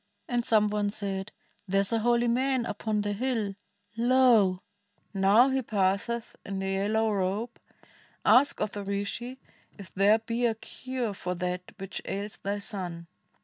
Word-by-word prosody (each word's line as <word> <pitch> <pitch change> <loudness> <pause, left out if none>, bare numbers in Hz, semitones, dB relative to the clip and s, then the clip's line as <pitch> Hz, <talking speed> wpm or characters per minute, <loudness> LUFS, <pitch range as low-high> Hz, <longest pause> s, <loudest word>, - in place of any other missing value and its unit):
And 240 -1 0
some 215 -2 +4
one 210 0 0
said, 200 -2 -4 0.2
' 205 - -34
There 195 +1 +2
is 200 +3 +1
a 225 - +2
holy 240 +1 +2
man 255 +1 +1
upon 210 0 -2
the 205 0 -1
hill 225 -3 -1 0.2
— - - -42
Lo 235 -6 +4 0.5
I - - -2
now 210 +7 +6
he 265 0 +1
passeth 210 +2 -1
in 195 0 -5
the 195 0 -2
yellow 215 +3 +1
robe 200 +4 -2 0.4
— - - -27 0.3
Ask 275 +3 +5
of 210 - 0
the 205 - -5
Rishi 205 +6 -3 0.4
if 195 -4 -12
there 200 +3 +5
be 230 +2 -1
a 225 - 0
cure 250 0 -5
For 180 -1 -4
that 180 0 -4
which 195 0 -6
ails 200 +2 -5
thy 200 +1 -2
son.' 185 -5 -5
210 Hz, 175 wpm, -28 LUFS, 195-235 Hz, 0.5 s, now